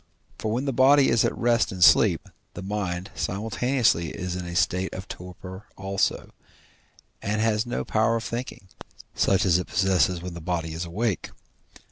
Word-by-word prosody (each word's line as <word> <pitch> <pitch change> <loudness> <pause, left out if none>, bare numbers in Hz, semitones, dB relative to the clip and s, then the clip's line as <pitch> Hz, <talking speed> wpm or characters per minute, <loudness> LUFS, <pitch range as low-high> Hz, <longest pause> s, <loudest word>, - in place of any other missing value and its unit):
For 110 - -2
when 125 +5 -1
the 135 - -1
body 135 +3 +5
is 115 - +3
at - - -1
rest 120 -1 +2
in 90 -3 0
sleep, - - +5 0.3
the 90 - -6
mind 95 -2 -3
simultaneously 105 - 0
is 90 +5 -5
in 90 -1 -5
a 85 - -6
state 90 -1 +1
of 95 +1 -7
torpor 90 +2 -9
also, 95 0 -1 0.9
and 105 +2 -1
has 110 +1 +1
no 120 - -3
power 110 +1 +2
of 115 - -2
thinking, 120 -5 -6 0.5
such 95 0 +2
as 90 -1 +4
it 90 - -5
possesses 90 -1 +2
when 90 0 -7
the 85 - -8
body 80 -1 -3
is 80 +2 -4
awake. 100 +4 -2
95 Hz, 170 wpm, -25 LUFS, 90-115 Hz, 0.9 s, body